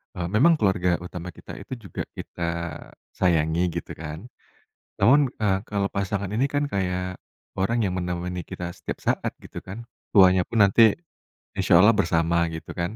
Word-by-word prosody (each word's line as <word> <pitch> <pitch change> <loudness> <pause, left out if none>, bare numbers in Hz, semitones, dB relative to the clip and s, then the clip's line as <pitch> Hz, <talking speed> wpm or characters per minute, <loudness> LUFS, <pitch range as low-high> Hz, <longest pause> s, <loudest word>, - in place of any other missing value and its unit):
eee, 90 -1 -3
memang 155 +8 +5
keluarga 90 -4 +1
utama 90 0 -7
kita - - -11
itu 120 -6 -9
juga, - - -4
kita 85 - -7 0.7
sayangi 80 -2 +2 0.2
gitu - - -12
kan, 80 +8 -8 0.7
namun, 140 +1 +5
eee, 100 -3 +2
kalau 100 -1 0
pasangan 100 0 -2
ini 135 +5 +1
kan 145 0 0
kayak, 90 -5 -2 0.4
orang 110 +4 0
yang 95 - -1
menemani 90 0 -3
kita 85 -1 -5
setiap - - -6
saat - - 0
gitu - - -10
kan. 110 +5 -9 0.3
Tuanya 95 -1 +7
pun 110 -3 +4
nanti, 105 +2 +5 0.6
insya 95 -2 +2
Allah 110 - +7
bersama 85 -4 +1
gitu 80 -1 -7
kan. 85 +4 -3
95 Hz, 160 wpm, -24 LUFS, 90-105 Hz, 0.7 s, Tuanya